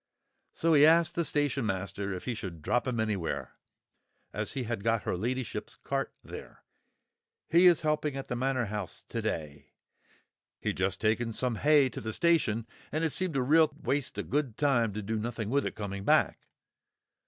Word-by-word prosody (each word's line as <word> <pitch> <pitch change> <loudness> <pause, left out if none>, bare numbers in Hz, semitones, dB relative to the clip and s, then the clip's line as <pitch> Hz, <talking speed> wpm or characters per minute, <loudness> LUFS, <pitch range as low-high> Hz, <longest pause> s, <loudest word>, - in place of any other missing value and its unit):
"so 165 0 +1
he 145 -1 +7
asked 165 +2 +5
the 170 - 0
station 145 -3 0
master 100 0 -2
if 90 -1 -5
he 125 - -1
should 90 -8 -7
drop 125 - +1
'em 120 -3 -1
anywhere, 85 - -2 0.7
as - - -3
he 135 - -2
had 115 -3 -3
got 115 -1 +1
her - - -1
ladyship's 120 +5 -3
cart - - -3
there. - - -10 0.9
He 175 +3 +6
is 170 -2 +5
helping 150 -2 0
at 135 - -5
the 125 - -2
Manor 130 0 0
House 105 -3 -5
to - - -3
day. 75 -3 -4 0.9
He'd - - -2
just 95 +1 0
taken 115 +1 +1
some 125 0 -1
hay 150 0 +5
to - - -7
the 110 0 -4
station, 145 -10 +2 0.3
and 155 +2 -1
it 160 - +1
seemed 185 -2 0
a 130 - +2
real 155 +3 +5
waste 140 0 -1
o' - - -1
good 140 -6 -1
time 125 -7 +2
to 105 +1 -4
do 110 +2 -2
nothing 115 -1 -3
with 140 +1 +2
it - - -6
coming 100 -2 -5
back. - - +2
120 Hz, 185 wpm, -30 LUFS, 105-145 Hz, 0.9 s, he